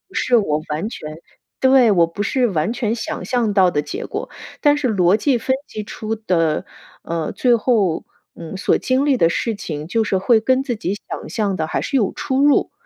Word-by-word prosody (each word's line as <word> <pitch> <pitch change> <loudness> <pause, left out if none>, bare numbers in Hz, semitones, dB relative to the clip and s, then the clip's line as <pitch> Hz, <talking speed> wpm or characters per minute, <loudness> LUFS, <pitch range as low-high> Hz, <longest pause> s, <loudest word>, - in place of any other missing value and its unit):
是 250 - +2
我 155 -8 0
完 155 +9 -2
全 155 -8 -8 0.5
对， 260 -3 +5
我 170 -4 +4
不 200 +5 -4
是 255 +2 +1
完 185 +2 -1
全 230 -2 -1
想 225 - -5
象 240 -4 0
到 190 -3 +5
的 145 - 0
结 415 +6 -5
果， - - -5 0.3
但 290 0 +4
是 280 -4 0
逻 185 -2 +3
辑 250 +3 +1
分 260 +3 0
析 215 - -6
出 220 +2 -5
的， 165 -7 0 0.4
呃， 165 -2 -3
最 245 -2 +3
后， 205 -8 +1 0.3
嗯， 165 +2 -8
所 - - +2
经 260 +2 0
历 275 -3 +3
的 165 - +4
事 230 +5 -1
情， 160 -7 -6
就 225 +4 +1
是 195 - +1
会 220 +4 +3
跟 260 +4 +1
自 250 -3 -2
己 200 -2 -2
想 - - -6
象 205 -3 -1
的 160 -1 -2
还 - - -2
是 275 - -1
有 210 -7 +1
出 265 -1 -1
入， 290 - +3
215 Hz, 225 characters per minute, -20 LUFS, 175-250 Hz, 0.5 s, 对